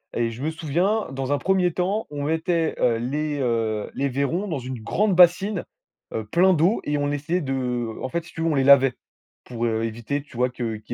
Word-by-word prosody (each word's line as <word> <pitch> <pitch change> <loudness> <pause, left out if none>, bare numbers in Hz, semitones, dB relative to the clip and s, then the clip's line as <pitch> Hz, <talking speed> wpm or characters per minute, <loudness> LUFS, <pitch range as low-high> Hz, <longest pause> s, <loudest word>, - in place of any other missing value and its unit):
et 115 -1 0
je 115 +3 -9
me 155 - 0
souviens, 170 +7 0
dans 135 +1 -3
un 145 - +3
1er 185 +1 +2
temps, 190 +6 -1
on 145 -1 -5
mettait, 160 +1 0
heu, 115 -2 +3
les 145 +5 -2
heu 115 -4 -1
les 140 0 -1
vairons 140 +9 -1
dans 160 -6 -2
une 130 -2 -6
grande 195 - +1
bassine, 185 +3 +4 0.5
heu, 110 - -3
plein 180 - +4
d'eau, 175 +8 +2
et 145 0 0
on 145 0 0
essayait 165 +5 -1
de 125 -5 -2
en 130 - -3
fait 170 +5 -2
si - - -14
tu 165 - -5
veux 165 - +1
on 160 - +1
les 135 - +2
lavait. 135 -1 +6 0.5
Pour, 120 -1 -4
heu, 110 -1 0
éviter 115 +5 -3
tu 140 -3 -14
vois 125 +1 +2
que 120 -3 -4
qu'il 105 - -8
145 Hz, 225 wpm, -24 LUFS, 125-170 Hz, 0.5 s, lavait